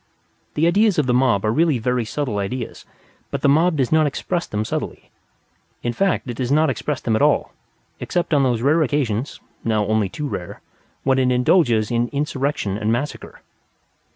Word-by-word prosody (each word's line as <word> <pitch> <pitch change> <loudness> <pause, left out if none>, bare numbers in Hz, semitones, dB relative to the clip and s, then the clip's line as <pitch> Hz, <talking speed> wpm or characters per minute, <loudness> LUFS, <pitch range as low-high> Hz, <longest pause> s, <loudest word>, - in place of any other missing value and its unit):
The 155 - +2
ideas 200 +3 +3
of 150 - +2
the 125 - +1
mob 125 -5 +2
are 110 - +2
really 160 -1 +2
very 125 +1 -1
subtle 115 -3 -2
ideas; 115 +4 -5 0.4
but - - -4
the - - +4
mob 160 +4 +3
does 130 -3 0
not 155 -1 +4
express 175 +5 -3
them 105 +1 -2
subtly. - - -5 0.7
In 120 - -1
fact, 195 -1 0
it 120 -2 -5
does 125 0 -2
not 155 +2 +3
express 150 -3 -3
them 115 - 0
at 110 - 0
all, - - +2 0.5
except 175 -2 -2
on 145 - +4
those 120 -3 +1
occasions 145 -5 +1 0.2
(now 110 -2 +1
only 110 -2 +1
too 150 +9 -4
rare) 95 -6 -6 0.4
when 135 0 +2
it 130 -1 +2
indulges 125 - +3
in 120 0 +1
insurrection 140 -7 -2
and 110 0 0
massacre. 130 +6 -4
130 Hz, 180 wpm, -21 LUFS, 115-150 Hz, 0.7 s, the